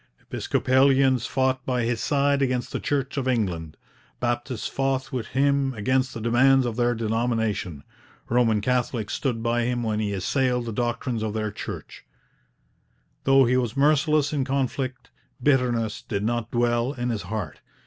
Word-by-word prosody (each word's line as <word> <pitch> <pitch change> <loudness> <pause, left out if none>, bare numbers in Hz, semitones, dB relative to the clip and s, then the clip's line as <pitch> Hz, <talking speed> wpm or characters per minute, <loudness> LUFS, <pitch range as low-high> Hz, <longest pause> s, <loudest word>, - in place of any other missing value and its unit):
Episcopalians 130 -1 +2
fought 130 -1 0
by 125 -2 -1
his 115 0 -1
side 140 0 +2
against 125 -2 0
the - - -2
Church 140 -1 -2
of 130 -1 -1
England; 90 -11 -1 0.4
Baptists 120 -1 -2
fought 135 -1 -1
with 125 -4 -3
him 140 -1 +1
against 130 +5 +1
the - - -4
demands 130 +4 +4
of 120 -2 -2
their 120 0 +1
denomination; 110 -8 -1 0.4
Roman 115 -3 +2
Catholics 120 -3 -1
stood 120 -5 -2
by 120 0 +1
him 120 0 -1
when 110 -1 -1
he 105 -1 -1
assailed 125 +5 0
the 115 - -4
doctrines 120 0 -2
of 110 -1 -3
their 110 -1 -2
Church. - - -8 1.2
Though 135 0 +6
he 125 +2 +2
was 120 0 -1
merciless 150 +1 +3
in 140 -3 +1
conflict, 130 -1 -2 0.3
bitterness 125 -6 +1
did 100 -1 -3
not 120 0 -1
dwell 120 +2 +1
in 120 -2 -3
his 110 -3 -2
heart. 105 +2 -5
120 Hz, 155 wpm, -25 LUFS, 115-135 Hz, 1.2 s, Though